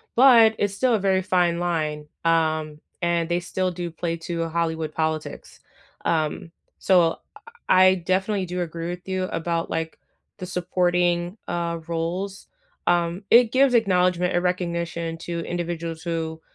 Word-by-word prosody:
but 230 -4 +7
it's 205 -1 0
still 250 +2 +2
a - - 0
very 190 -1 +2
fine 175 -2 +1
line. 155 -4 -2 0.2
Um, 155 -2 +1 0.2
and 170 -1 +1
they 175 +1 +1
still 185 +1 -2
do 175 -1 -5
play 165 +1 -3
to 165 0 -3
a 165 - -3
Hollywood 160 -2 -2
politics. 160 -1 -3 0.5
Um, 160 +1 -1 0.3
so 175 -3 +4
I - - -14 0.5
I 185 0 +6
definitely 190 +2 -1
do 180 0 -3
agree 170 0 -4
with 175 +1 -7
you 185 -1 -1
about, 170 -2 -2
like, 165 0 -3 0.4
the 185 - -6
supporting, 175 0 0
uh, 170 -1 -2
roles. 175 +4 -3 0.4
Um, 175 +2 +1
it 235 -1 +6
gives 265 0 +4
acknowledgement 180 -5 +2
and 175 - +1
recognition 170 -2 -2
to 170 0 -4
individuals 170 -1 -4
who 160 -2 -3
175 Hz, 150 wpm, -24 LUFS, 165-185 Hz, 0.5 s, but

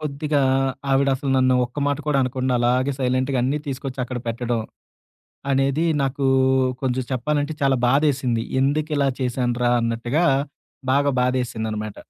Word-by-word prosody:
కొద్దిగా 150 0 -1 0.5
ఆవిడ 135 +1 +3
అసలు 135 +1 -3
నన్ను 130 0 +3
ఒక్క 120 +4 -8
మాట 145 0 0
కూడా 145 -2 +2
అనకుండా 130 0 -1
అలాగే 125 +3 +2
సైలెంట్‌గా 130 +1 0
అన్నీ 135 +4 0
తీసుకొచ్చి 135 -1 -5
అక్కడ 125 0 -5
పెట్టడం 115 0 -1 0.9
అనేది 135 +4 +1 0.2
నాకూ 135 0 -1 0.6
కొంచెం 130 0 0
చెప్పాలంటే 145 +4 -1
చాలా 135 -1 +3
బాధేసింది. 135 -4 +1 0.2
ఎందుకిలా 145 0 +1
చేశాన్రా? 125 -1 0
అన్నట్టుగా 120 +7 0 0.7
బాగా 140 +1 +3
బాధేసిందన్నమాట. 110 -4 -2
130 Hz, 125 wpm, -22 LUFS, 125-140 Hz, 0.9 s, ఆవిడ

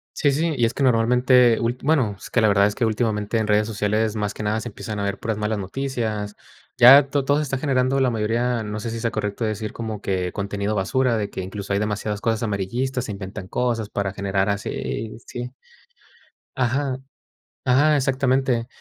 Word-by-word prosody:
Sí, 145 - +2
sí, 160 +3 0
y 120 - +3
es 115 - -1
que - - -5
normalmente, 125 0 +4
ult 120 +2 -2
bueno, 135 -9 +2
es - - -11
que 115 - +2
la 110 - +5
verdad 100 0 +4
es 105 - +1
que 120 - 0
últimamente 110 -1 0
en 110 - +1
redes 105 +1 +2
sociales, 110 +1 0
más 105 -2 -2
que - - -8
nada 105 +1 0
se 110 - -6
empiezan 105 0 -6
a - - -1
ver 100 0 -2
puras 110 -2 -2
malas 105 0 -1
noticias. 110 -1 -3 0.4
Ya 135 +3 +8
to 140 -1 0
todo 145 +2 +2
se 150 - +1
está 135 -1 -2
generando 135 -1 +1
la 130 - +3
mayoría, 115 +1 0
no 105 0 -4
sé 115 - -4
si 115 0 -4
sea 115 0 -1
correcto 105 +1 -2
decir 110 0 -3
como 110 -3 -5
que 90 -2 -1
contenido 100 +1 -2
basura, 115 +5 +1
de 105 -1 -2
que - - -5
incluso 100 +1 -5
hay 100 - +1
demasiadas 105 0 -2
cosas 115 0 0
amarillistas, 120 +5 -2
inventan 100 -1 -6
cosas 115 -3 -1
para 100 -2 -2
generar 100 0 0
así, 110 +2 -3
sí 125 0 -5 1.1
ajá 130 +1 0 0.7
ajá, 145 +4 +4
exactamente. 130 -3 +1
110 Hz, 200 wpm, -23 LUFS, 105-125 Hz, 1.1 s, Ya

